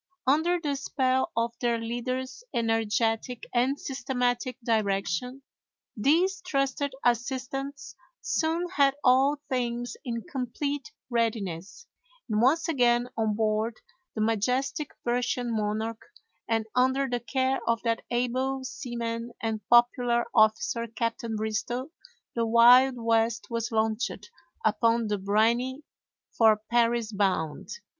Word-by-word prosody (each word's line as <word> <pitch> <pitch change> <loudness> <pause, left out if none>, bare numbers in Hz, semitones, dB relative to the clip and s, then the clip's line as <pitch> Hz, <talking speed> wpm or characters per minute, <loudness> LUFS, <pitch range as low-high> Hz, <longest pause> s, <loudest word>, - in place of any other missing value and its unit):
Under 320 +6 +3
the 295 -4 -2
spell 260 -1 0
of 230 0 +1
their 240 -1 +1
leader's 255 - -4
energetic 225 +1 0
and 255 +3 +1
systematic 250 -2 -2
direction, 220 +3 -1 0.5
these 345 - +2
trusted 275 -4 -1
assistants 265 +4 -2 0.3
soon 330 +2 0
had 275 -1 +4
all 270 +3 +4
things 245 -1 -2
in 235 -4 -4
complete 280 +5 -4 0.2
readiness, 215 - -2 0.4
and 215 -2 +1
once 285 +9 +3
again 245 -5 +2
on 220 -2 0
board 220 +1 0 0.4
the 215 - -2
majestic 250 +7 0
Persian 245 -1 -1
Monarch, 220 +1 -2 0.5
and 225 -1 +1
under 260 +2 +2
the 245 -1 -1
care 260 +2 0
of 230 0 +2
that 230 -1 0
able 255 +2 -1
seaman 235 -2 -4
and 220 -1 -2
popular 240 0 +4
officer 225 +1 +2
Captain 230 0 -3
Bristow, 220 +6 -3 0.4
the 230 -1 0
Wild 245 +3 +7
West 230 +1 0
was 230 0 -2
launched 220 - -1 0.3
upon 230 +1 +2
"the 205 -1 -1
briny," 235 +8 +1 0.5
for 220 -2 +5
Paris 235 -1 +2
bound. 190 -7 -1
240 Hz, 115 wpm, -27 LUFS, 225-260 Hz, 0.5 s, Wild